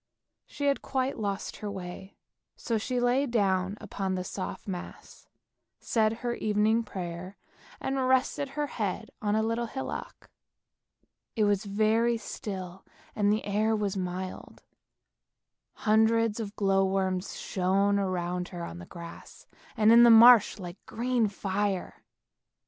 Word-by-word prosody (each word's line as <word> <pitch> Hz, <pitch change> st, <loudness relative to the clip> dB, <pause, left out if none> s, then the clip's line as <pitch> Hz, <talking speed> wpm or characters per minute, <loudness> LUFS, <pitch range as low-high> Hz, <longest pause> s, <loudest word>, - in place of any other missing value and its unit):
She 285 Hz, -, -5 dB
had 280 Hz, -1 st, +2 dB
quite 260 Hz, -1 st, -2 dB
lost 200 Hz, -2 st, -3 dB
her 210 Hz, -, -5 dB
way, 190 Hz, 0 st, -8 dB, 0.4 s
so 230 Hz, -2 st, -1 dB
she 250 Hz, +3 st, -2 dB
lay 250 Hz, +3 st, +2 dB
down 195 Hz, -4 st, +1 dB
upon 190 Hz, -1 st, -3 dB
the 185 Hz, -, -2 dB
soft 185 Hz, +2 st, -6 dB
moss, 180 Hz, -3 st, -8 dB, 0.5 s
said 220 Hz, -2 st, +1 dB
her 240 Hz, -, 0 dB
evening 215 Hz, +1 st, +2 dB
prayer, 185 Hz, -2 st, -7 dB, 0.4 s
and 265 Hz, -1 st, -1 dB
rested 260 Hz, +2 st, +1 dB
her 295 Hz, -, +1 dB
head 220 Hz, -4 st, -4 dB
on 210 Hz, 0 st, +1 dB
a 220 Hz, -, +2 dB
little 230 Hz, +1 st, -1 dB
hillock. 265 Hz, +4 st, -7 dB, 1.0 s
It 220 Hz, -, +2 dB
was 205 Hz, 0 st, +1 dB
very 220 Hz, +3 st, +2 dB
still 190 Hz, -4 st, -7 dB, 0.3 s
and 205 Hz, -1 st, +2 dB
the 215 Hz, -, 0 dB
air 215 Hz, +2 st, +1 dB
was 205 Hz, -2 st, -1 dB
mild, 185 Hz, 0 st, -5 dB, 1.1 s
hundreds 220 Hz, +1 st, +2 dB
of 210 Hz, -2 st, -5 dB
glow 195 Hz, -1 st, +2 dB
worms 190 Hz, -1 st, -1 dB
shone 195 Hz, +2 st, +1 dB
around 180 Hz, -2 st, -2 dB
her 175 Hz, -3 st, -7 dB
on 85 Hz, -, -8 dB
the 85 Hz, -, -10 dB
grass 170 Hz, -1 st, -11 dB, 0.3 s
and 220 Hz, 0 st, +5 dB
in 235 Hz, +1 st, +8 dB
the 240 Hz, -, +8 dB
marsh 230 Hz, -1 st, +8 dB
like 180 Hz, -2 st, -9 dB
green 240 Hz, -1 st, 0 dB
fire. 195 Hz, -, -3 dB
205 Hz, 140 wpm, -28 LUFS, 190-230 Hz, 1.1 s, in